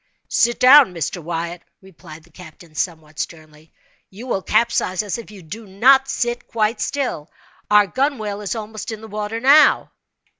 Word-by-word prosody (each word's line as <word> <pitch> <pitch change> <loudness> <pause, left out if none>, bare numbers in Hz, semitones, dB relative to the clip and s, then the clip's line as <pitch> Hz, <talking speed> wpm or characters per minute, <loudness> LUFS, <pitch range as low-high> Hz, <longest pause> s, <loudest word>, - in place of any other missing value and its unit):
"Sit 240 0 +1
down, 255 -6 +7
Mr. 170 +2 -4
Wyatt," 170 +1 -5 0.2
replied 165 -4 -14
the 170 - -23
captain, 165 -1 -15
somewhat 155 -2 -5
sternly, 155 -1 -8 0.4
"you 210 +6 -11
will 215 -6 -2
capsize 215 -3 0
us 205 +2 -4
if 230 - -11
you 200 -4 -13
do 210 +7 -10
not 265 +8 +4
sit 240 -2 -3
quite 220 0 -1
still. 255 - -3 0.4
Our 210 0 +5
gunwhale 215 -3 -2
is 205 +2 -4
almost 220 +1 -7
in 220 -1 -7
the 220 - -10
water 210 +1 -4
now." 280 +5 +5
210 Hz, 160 wpm, -20 LUFS, 170-235 Hz, 0.4 s, down